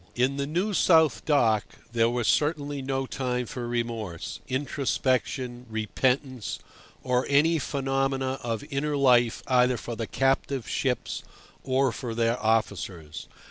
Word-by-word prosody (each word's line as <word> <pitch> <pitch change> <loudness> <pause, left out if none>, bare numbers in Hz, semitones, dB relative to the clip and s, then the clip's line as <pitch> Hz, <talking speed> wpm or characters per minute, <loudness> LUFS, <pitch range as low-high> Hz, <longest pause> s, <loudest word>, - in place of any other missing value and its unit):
In 130 +3 +1
the 140 0 -1
New 180 +7 -1
South 160 -4 +4
Dock 115 -8 +3 0.3
there 115 -1 +3
was 120 -2 -1
certainly 145 -2 +1
no 135 0 -1
time 125 -2 -2
for 120 +1 -5
remorse, 115 -7 -3
introspection, 130 -2 -1
repentance, 125 +3 -1 0.5
or 125 0 +1
any 155 +4 +4
phenomena 135 -1 -1
of 115 -2 -3
inner 145 +1 -1
life 120 -4 +4
either 125 -1 +3
for 120 +1 -6
the 115 -1 -4
captive 135 -2 0
ships - - -1 0.4
or 130 0 +2
for 115 -1 -5
their 115 +1 +1
officers. 100 -8 -1
130 Hz, 130 wpm, -27 LUFS, 115-140 Hz, 0.5 s, South